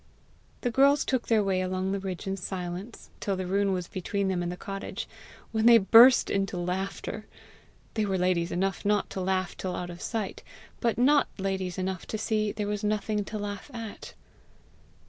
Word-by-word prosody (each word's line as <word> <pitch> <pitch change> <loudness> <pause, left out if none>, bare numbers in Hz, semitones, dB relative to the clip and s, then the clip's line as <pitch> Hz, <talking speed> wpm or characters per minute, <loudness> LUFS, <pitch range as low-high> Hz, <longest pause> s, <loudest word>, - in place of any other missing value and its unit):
The 245 - 0
girls 275 +3 +4
took 260 -3 0
their 220 -2 +4
way 190 -2 +1
along 185 +1 -1
the 200 - -1
ridge 190 0 -5
in 195 0 -1
silence, 185 +3 -6
till 200 - -1
the 185 0 -3
ruin 195 +2 +1
was 180 -2 -2
between 195 +1 -2
them 180 -2 0
and 175 0 -2
the 180 - -6
cottage, 195 +1 -5 0.4
when 220 0 +2
they 235 -1 +9
burst 230 +5 +7
into 195 -1 0
laughter. 190 +4 -3 0.7
They 215 -2 0
were 190 -1 0
ladies 180 -1 +1
enough 195 +2 -1
not 205 -1 +1
to 190 - -3
laugh 185 0 0
till 185 -1 -4
out 175 0 -4
of 175 - -10
sight, 220 -4 -3 0.4
but 235 -2 +1
not 280 +4 +4
ladies 190 -2 -2
enough 185 -1 -3
to 220 - -3
see 215 -1 0
there 210 0 -3
was 210 0 -2
nothing 210 0 0
to 215 - -5
laugh 205 +4 -5
at. 225 -3 -7
195 Hz, 185 wpm, -28 LUFS, 185-215 Hz, 0.7 s, they